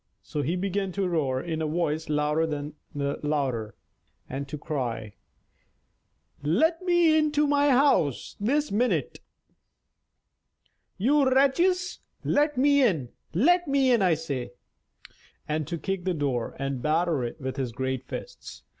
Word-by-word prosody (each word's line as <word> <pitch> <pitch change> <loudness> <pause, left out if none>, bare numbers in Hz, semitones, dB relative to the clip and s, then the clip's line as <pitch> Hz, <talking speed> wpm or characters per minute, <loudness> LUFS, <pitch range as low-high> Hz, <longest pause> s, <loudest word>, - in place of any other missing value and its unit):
So 150 - -3
he 155 +6 -1
began 195 +1 -1
to 195 0 0
roar 145 -7 0
in 160 +1 -3
a 155 - 0
voice 160 -1 -1
louder 150 +2 +1
than 150 -1 -4 0.2
the 140 0 -2
thunder, 135 -8 -1 0.5
and 135 +2 -5
to 150 - -6
cry: 120 -8 -4 1.3
"Let 285 - +2
me 345 -3 +4
into 300 -1 +2
my 285 0 +3
house 255 - +2
this 290 +8 0
minute, 200 - 0 1.8
you 270 +5 +3
wretches; 345 +8 +2 0.2
let 295 -1 +1
me 285 +2 +4
in, 165 - +1 0.3
let 350 - +4
me 275 -2 +3
in, 235 -3 +4
I 180 -4 +4
say," 135 -6 -5 0.9
and 155 -1 -2
to 170 - -3
kick 195 +1 -3
the 185 -2 0
door 135 -6 -2
and 135 -2 -3
batter 155 -1 +1
it 120 +6 -5
with 130 -1 -4
his 130 -3 -2
great 130 +1 -3
fists. - - -8
165 Hz, 140 wpm, -27 LUFS, -, 1.8 s, me